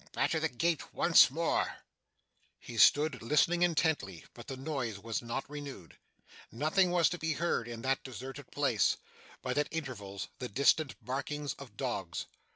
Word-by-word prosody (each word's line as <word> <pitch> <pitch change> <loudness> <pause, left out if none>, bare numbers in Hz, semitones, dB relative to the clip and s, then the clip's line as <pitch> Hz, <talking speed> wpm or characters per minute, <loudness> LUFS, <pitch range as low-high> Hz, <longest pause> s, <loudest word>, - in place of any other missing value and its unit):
Batter - - +1
the - - 0
gate 165 +5 -1
once - - +7
more!' - - 0 0.8
He 115 -2 -7
stood 150 - +5
listening 150 +7 +3
intently, 160 - +1
but 120 - -12
the 135 - -5
noise 130 -6 -3
was 115 +2 -3
not 120 +3 -4
renewed. 140 - -8 0.6
Nothing 155 - +2
was 175 -2 +4
to 175 - -4
be 160 0 0
heard 155 -7 -1
in 115 -1 -7
that 135 0 0
deserted 135 +2 -8
place, 135 -7 +2 0.5
but, - - 0
at 150 - +1
intervals, 115 -11 -5
the 125 - -4
distant 140 +3 +3
barkings 140 +2 -3
of 120 -7 -12
dogs. 95 -10 -3
135 Hz, 155 wpm, -32 LUFS, 115-155 Hz, 0.8 s, once